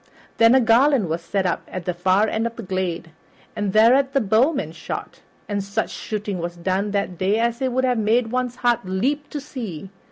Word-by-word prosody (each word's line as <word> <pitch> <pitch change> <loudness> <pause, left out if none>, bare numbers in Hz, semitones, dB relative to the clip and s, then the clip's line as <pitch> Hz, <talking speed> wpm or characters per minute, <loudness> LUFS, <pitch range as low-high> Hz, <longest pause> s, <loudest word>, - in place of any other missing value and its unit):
Then 230 +2 +6
a - - +6
garland 240 - +3
was 165 +2 -2
set 190 +3 -2
up 175 - 0
at 185 -1 -6
the 180 - -1
far 185 +4 +2
end 220 +2 -1
of 230 - -8
the 230 - -7
glade, 185 -3 -3 0.4
and 205 -2 -1
thereat 255 +6 +4
the 275 - +3
bowmen 220 - +1
shot, 160 - -7 0.3
and 200 -1 -2
such 200 +3 -2
shooting 210 -3 -4
was 175 +1 -5
done 190 +4 -1
that 200 -3 -2
day 195 +3 +2
as 235 +2 0
it 260 -1 0
would 260 +1 0
have 250 -2 +1
made 225 +2 +1
one's 250 -1 -1
heart 240 -2 +1
leap 260 +11 -1
to 295 - -4
see. 215 - -7
215 Hz, 210 wpm, -22 LUFS, 185-245 Hz, 0.4 s, Then